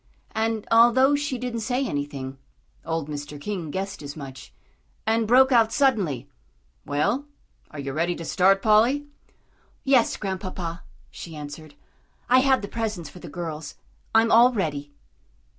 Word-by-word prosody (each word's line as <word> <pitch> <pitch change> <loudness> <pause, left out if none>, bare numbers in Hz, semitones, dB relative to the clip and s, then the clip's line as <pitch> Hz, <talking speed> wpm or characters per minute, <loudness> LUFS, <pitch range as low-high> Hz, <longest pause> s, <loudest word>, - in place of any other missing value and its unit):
And, 220 -1 -1
although 240 +4 +6
she 285 -2 -2
didn't 245 -1 -4
say 250 +4 -1
anything, 140 - -4 0.4
old 165 -2 -3
Mr. 145 0 -6
King 180 -1 -4
guessed 195 +3 -4
as 145 -1 -7
much, 135 -3 -9 0.5
and 225 0 +1
broke 260 +3 +6
out 230 -3 +4
suddenly, 200 - +1 0.6
"Well, 150 - 0 0.4
are 155 - -11
you 140 -1 -4
ready 170 +4 0
to 165 - -7
start, 195 +4 +3
Polly?" 235 +7 +4 0.8
"Yes, 265 -4 +3
Grandpapa," 185 -3 -4 0.3
she 165 -2 -9
answered. 150 0 -9 0.5
"I 255 +1 +6
have 265 -3 +3
the - - -3
presents 210 -8 -4
for 180 - -12
the 175 - -9
girls. 155 -2 -6 0.4
I'm 225 +1 +5
all 240 +2 +7
ready." 145 -8 -2
195 Hz, 140 wpm, -25 LUFS, 150-235 Hz, 0.8 s, all